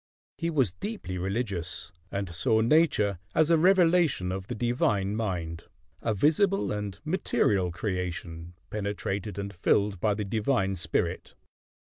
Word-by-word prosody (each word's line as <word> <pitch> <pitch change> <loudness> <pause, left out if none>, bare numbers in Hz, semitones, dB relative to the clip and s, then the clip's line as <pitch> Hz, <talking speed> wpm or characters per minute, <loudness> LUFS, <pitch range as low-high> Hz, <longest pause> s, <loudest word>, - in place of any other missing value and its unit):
He 165 - 0
was 135 - +1
deeply 200 - -5
religious, 95 -4 -3 0.2
and 100 -3 -3
saw 110 +6 +2
Nature 115 - +3 0.2
as 160 +1 +4
a 165 - +6
revelation 170 - +4
of 95 0 -4
the 120 - -4
divine 105 -4 +1
mind; 90 -7 -3 0.4
a 115 - 0
visible 180 - +2
and 105 -2 -4
material 100 - +1
creation, 85 -3 -4 0.2
penetrated 100 -1 -3
and 100 0 -4
filled 100 +2 +1
by 105 +2 +1
the 105 0 -3
divine 105 -1 +1
spirit. 85 -3 -2
100 Hz, 130 wpm, -28 LUFS, 95-125 Hz, 0.4 s, a